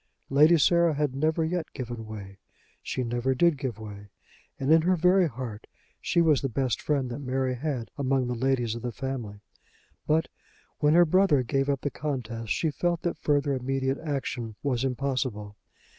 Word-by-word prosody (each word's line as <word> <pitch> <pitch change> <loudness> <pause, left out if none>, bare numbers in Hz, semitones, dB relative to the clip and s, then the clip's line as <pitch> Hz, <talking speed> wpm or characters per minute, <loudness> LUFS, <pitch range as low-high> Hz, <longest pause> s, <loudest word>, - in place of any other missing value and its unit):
Lady 155 +5 +6
Sarah 170 +1 +4
had 145 -2 0
never 155 +3 +1
yet 170 -1 -3
given 120 -4 -6
way; 100 -3 -9 0.4
she 130 - -3
never 120 +2 0
did 170 +4 +4
give 130 -5 -4
way; 105 -2 -9 0.5
and, 135 +4 +3
in 160 - +6
her 180 +3 +2
very 180 +1 +4
heart, 120 -6 -7 0.3
she 170 - +1
was 155 -4 +3
the 135 - -1
best 130 0 -1
friend 135 -4 0
that 120 - -5
Mary 130 -1 -1
had 125 -4 -3
among 135 -1 +1
the 125 - -2
ladies 125 -2 0
of 115 - -6
the 120 0 -3
family. 115 -5 -5 0.7
But 160 +1 +2 0.5
when 150 +1 +4
her 175 0 +7
brother 170 -5 +3
gave 135 +3 0
up 140 -2 0
the 145 - -2
contest 115 -7 -4
she 160 - +1
felt 175 +2 -1
that 175 - -2
further 145 -1 +1
immediate 135 +1 -1
action 135 -7 -4
was 130 -3 0
impossible. 125 -6 -2
135 Hz, 175 wpm, -27 LUFS, 120-150 Hz, 0.7 s, her